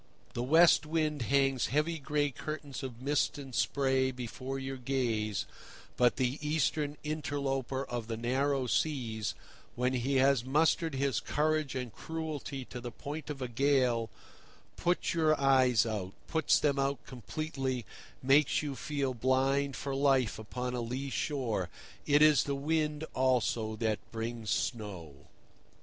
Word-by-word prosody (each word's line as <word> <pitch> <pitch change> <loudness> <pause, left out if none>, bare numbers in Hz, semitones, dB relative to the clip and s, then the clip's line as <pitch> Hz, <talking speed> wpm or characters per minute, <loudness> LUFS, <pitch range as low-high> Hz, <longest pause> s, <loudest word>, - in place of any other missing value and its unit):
The 120 - -2
West 160 +4 +5
Wind 155 -2 0
hangs 135 +1 +2
heavy 150 +4 0
gray 145 0 0
curtains 145 0 -6
of 130 -2 -7
mist 145 +1 +1
and 135 -3 -8
spray 130 0 +2
before 130 +1 -5
your 135 0 -4
gaze, 120 -5 -1 0.5
but 120 -1 +4
the 130 +2 0
Eastern 150 -1 0
interloper 140 -3 -2
of 120 -2 -4
the 115 -1 -3
narrow 130 +3 +1
seas, 120 -6 -1 0.4
when 125 +1 +1
he 130 +2 0
has 135 -2 +4
mustered 155 +3 +2
his 135 -3 +1
courage 155 -1 0
and 125 -3 -4
cruelty 155 -4 -5
to 125 - -8
the 120 - -5
point 150 +5 -7
of 135 -3 -4
a - - -2
gale, 125 -2 +2 0.7
puts 175 +1 0
your 155 -3 +3
eyes 130 -4 +4
out, 100 -4 -3
puts 160 -2 +3
them 140 -2 +1
out 135 0 -1
completely, 130 - -4 0.4
makes 140 +3 +4
you 145 -2 -3
feel 140 -4 -2
blind 135 +3 +1
for 140 - -4
life 135 -5 +2
upon 125 +3 -4
a 125 - -2
lee 130 +4 -4
shore. 120 - -1 0.4
It 145 +1 +6
is 155 -2 +6
the 140 - -1
wind, 150 +1 0
also, 120 -4 +1
that 110 -1 0
brings 115 -1 -4
snow. 100 - -2
135 Hz, 145 wpm, -31 LUFS, 120-145 Hz, 0.7 s, It